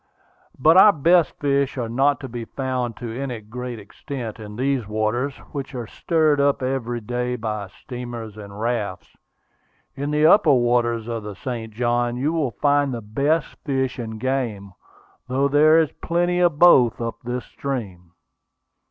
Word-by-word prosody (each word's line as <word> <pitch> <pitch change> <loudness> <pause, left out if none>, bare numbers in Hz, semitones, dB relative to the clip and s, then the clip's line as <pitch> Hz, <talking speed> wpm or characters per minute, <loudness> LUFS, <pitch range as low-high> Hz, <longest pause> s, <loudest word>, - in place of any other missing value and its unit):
But 160 +6 +5
our 205 +2 +9
best 170 +1 +3
fish 140 -1 0
are 120 -2 -2
not 135 +5 +2
to 135 - -5
be 120 -1 -6
found 130 -2 -3
to 115 -2 -6
any 130 -3 -4
great 120 +3 -7
extent 115 +2 -7
in 105 -1 -9
these 130 -2 -1
waters, 110 +6 -1 0.2
which 140 -2 -6
are 120 -2 -4
stirred 155 +3 +1
up 140 -1 +2
every 125 -2 -2
day 125 +2 -2
by 105 -3 -4
steamers 120 +1 -8
and 100 -1 -10
rafts. 110 -5 -3 0.8
In 140 +1 -4
the 150 +1 +2
upper 160 -3 +6
waters 120 -2 +1
of 115 -1 -3
the 105 -1 -7
St. 115 +1 -5
Johns 120 +1 0
you 145 +6 0
will 155 -5 0
find 145 +4 +1
the 120 -2 -4
best 140 +10 0
fish 130 -3 -1
and 110 -2 -5
game, 115 -7 -2 0.5
though 135 +2 +1
there 150 +3 +5
is 160 -3 +3
plenty 175 +1 +1
of 175 -4 +3
both 130 -9 +6
up 115 -1 -3
this 125 0 -4
stream." 95 -11 -6
125 Hz, 160 wpm, -22 LUFS, 115-140 Hz, 0.8 s, our